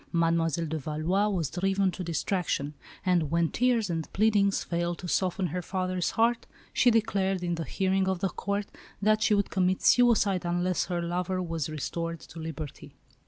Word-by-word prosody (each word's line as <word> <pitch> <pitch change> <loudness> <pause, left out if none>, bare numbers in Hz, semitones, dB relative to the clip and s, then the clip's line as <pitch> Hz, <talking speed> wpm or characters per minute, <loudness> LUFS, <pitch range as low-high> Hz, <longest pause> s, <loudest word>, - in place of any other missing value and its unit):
Mademoiselle 165 -1 +1
de 160 0 -3
Valois 155 +8 0
was 170 -8 -1
driven 195 +1 +1
to 185 - -6
distraction; 165 -3 -1 0.3
and 175 -5 +2
when 170 0 +2
tears 240 -3 +2
and 165 -3 -3
pleadings 205 -2 +3
failed 175 0 -2
to 180 - -7
soften 185 +1 0
her 180 +2 -2
father's 185 -1 -1
heart, 230 +1 +2 0.3
she 245 - +5
declared 200 -5 +1
in 175 -1 0
the 165 -1 -3
hearing 190 0 0
of 190 - 0
the 190 +2 -1
Court 200 +2 -2 0.3
that 215 +1 +3
she 210 - +4
would 200 -1 0
commit 185 -1 +1
suicide 215 -6 +4
unless 175 +1 0
her 175 -1 -2
lover 180 +2 -1
was 165 -4 -3
restored 165 +2 -4
to 165 - -11
liberty. 160 -3 -7
180 Hz, 170 wpm, -28 LUFS, 165-195 Hz, 0.3 s, she